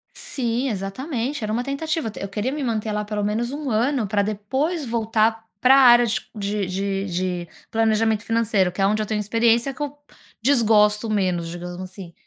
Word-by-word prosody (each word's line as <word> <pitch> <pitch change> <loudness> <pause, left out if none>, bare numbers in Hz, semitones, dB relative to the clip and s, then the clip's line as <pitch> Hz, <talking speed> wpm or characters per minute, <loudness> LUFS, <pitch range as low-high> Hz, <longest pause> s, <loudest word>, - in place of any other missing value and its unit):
Sim, 245 0 -2
exatamente, 235 - -3
era 215 - -2
uma 240 +3 0
tentativa 280 -1 -2
d - - -9
eu 200 - -4
queria 215 +6 -2
me 295 0 -3
manter 220 -3 -1
lá 210 0 -1
pelo 210 0 -3
menos 225 +4 -1
1 285 -3 -4
ano 240 +2 +1
pra 205 0 +1
depois 265 - -2
voltar 225 -1 +1 0.2
para 255 +3 +6
a 275 - +7
área 240 -2 +7
de 210 -3 -3
de 195 +1 -2
de 180 -1 -2 0.2
planejamento 220 -1 +2
financeiro, 220 -5 +1
que 190 - -11
é - - +4
onde 215 +2 +2
eu - - -1
tenho 215 -1 -1
experiência 230 +5 +2
que 295 - -11
eu 290 0 -4 0.4
desgosto 220 -4 +3
menos, 185 -5 0
digamos, 175 +1 -7
assim. 185 -2 -9
220 Hz, 185 wpm, -23 LUFS, 205-245 Hz, 0.4 s, a